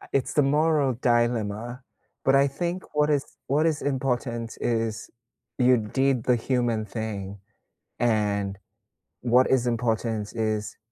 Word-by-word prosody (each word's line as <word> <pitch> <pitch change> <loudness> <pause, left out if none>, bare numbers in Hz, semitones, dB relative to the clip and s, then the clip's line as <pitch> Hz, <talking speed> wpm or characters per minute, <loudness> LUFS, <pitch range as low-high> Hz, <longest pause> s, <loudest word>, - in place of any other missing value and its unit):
I - - -13
It's 135 - 0
the 150 - +4
moral 145 -1 +2
dilemma, 120 0 0 0.4
but 135 - +4
I 140 +1 +5
think 175 +6 -3
what 150 0 +3
is 145 -2 +2 0.2
what 150 +4 +2
is 155 -3 0
important 125 -4 -2
is 115 -2 -1 0.5
you 125 0 +5
did 125 +3 0
the 125 -1 +3
human 120 -2 0
thing, 100 -2 -5 0.6
and 105 -4 0 0.6
what 125 +1 +4
is 125 -2 +2
important 115 -2 -1
is 110 -2 -2
120 Hz, 130 wpm, -26 LUFS, 110-135 Hz, 0.6 s, I